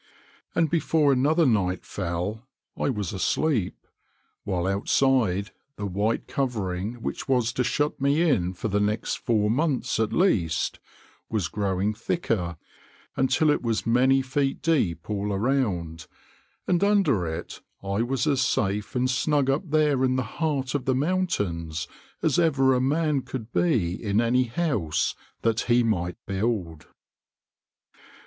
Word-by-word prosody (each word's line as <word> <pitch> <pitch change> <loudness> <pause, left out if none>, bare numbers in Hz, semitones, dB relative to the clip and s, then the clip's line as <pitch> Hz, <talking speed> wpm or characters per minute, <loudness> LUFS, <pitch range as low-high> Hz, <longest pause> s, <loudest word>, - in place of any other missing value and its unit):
And 165 - +3
before 155 -2 +2
another 155 +6 +3
night 95 -7 +1
fell 95 +6 -4 0.3
I - - -1
was 105 -8 -2
asleep, 110 - 0 0.6
while 90 -3 -1
outside 100 0 +1 0.2
the 105 - -5
white 100 +4 -1
covering 110 -3 -3
which - - -4
was 125 -2 +2
to 125 - 0
shut 145 +2 -1
me 145 +5 +3
in 95 - +1
for 110 - -3
the 105 -1 +1
next 105 +2 -1
four 105 -3 +1
months 130 -4 0
at 110 -1 +1
least, 85 - +1 0.5
was 105 -6 -1
growing 100 0 -1
thicker 105 - -2 0.6
until 135 +4 +3
it - - 0
was 115 -2 -1
many 130 +3 +3
feet 135 +1 -1
deep 95 - +1
all 105 -1 -2
around, 95 - -1 0.6
and 180 +1 +1
under 185 - +3
it 80 +2 -6 0.2
I 100 +2 -1
was 125 +2 0
as 140 -4 +2
safe 105 -4 0
and 125 0 +2
snug 135 +1 +1
up 155 +5 -2
there 150 -3 +2
in 130 0 +2
the 130 - 0
heart 135 +1 -2
of 140 -3 -2
the 130 - +2
mountains 105 - -1 0.4
as - - +2
ever 135 -6 +3
a 125 - +1
man 150 +1 +1
could 120 -3 -7
be 110 - +1
in 105 0 +1
any 125 +2 +2
house 115 - -1 0.3
that 115 -1 +2
he 120 0 +5
might 90 -6 -1
build. 95 -5 -2
120 Hz, 140 wpm, -25 LUFS, 100-140 Hz, 0.6 s, he